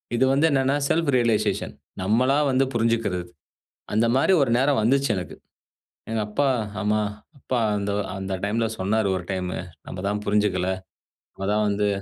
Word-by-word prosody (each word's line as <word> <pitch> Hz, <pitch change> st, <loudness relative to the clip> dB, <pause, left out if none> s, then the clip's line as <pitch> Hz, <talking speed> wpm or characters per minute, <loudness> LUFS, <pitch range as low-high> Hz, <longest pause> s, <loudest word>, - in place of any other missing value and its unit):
இது 130 Hz, -, +3 dB
வந்து 145 Hz, +4 st, +3 dB
என்னன்னா? 135 Hz, 0 st, +2 dB
செல்ஃப் 165 Hz, -2 st, +1 dB
ரியலைசேஷன் 115 Hz, -3 st, +1 dB, 0.3 s
நம்மளா 125 Hz, +8 st, +2 dB
வந்து 130 Hz, +1 st, +3 dB
புரிஞ்சுக்கிறது. 115 Hz, -6 st, 0 dB, 0.7 s
அந்தமாரி 120 Hz, -, +3 dB
ஒரு 125 Hz, -, +1 dB
நேரம் 135 Hz, -2 st, +3 dB
வந்துச்சு 135 Hz, +2 st, +2 dB
எனக்கு. 90 Hz, -, -6 dB, 0.7 s
எங்க 115 Hz, -1 st, 0 dB
அப்பா, 140 Hz, +6 st, +1 dB, 0.3 s
ஆமா 105 Hz, +1 st, +2 dB, 0.4 s
அப்பா 125 Hz, 0 st, -2 dB, 0.2 s
அந்த, 100 Hz, 0 st, -2 dB, 0.3 s
அந்த 95 Hz, 0 st, -4 dB
டைம்ல 115 Hz, +2 st, 0 dB
சொன்னாரு 100 Hz, +2 st, +1 dB
ஒரு 90 Hz, -, -5 dB
டைம். 90 Hz, -1 st, -2 dB, 0.4 s
நம்ம 90 Hz, -, -6 dB
தான் 105 Hz, 0 st, -2 dB
புரிஞ்சுக்கல. 100 Hz, -3 st, +1 dB, 0.7 s
நம்ம 95 Hz, 0 st, -5 dB
தான் 105 Hz, 0 st, +2 dB
வந்து 105 Hz, 0 st, +1 dB
110 Hz, 145 wpm, -24 LUFS, 100-130 Hz, 0.7 s, இது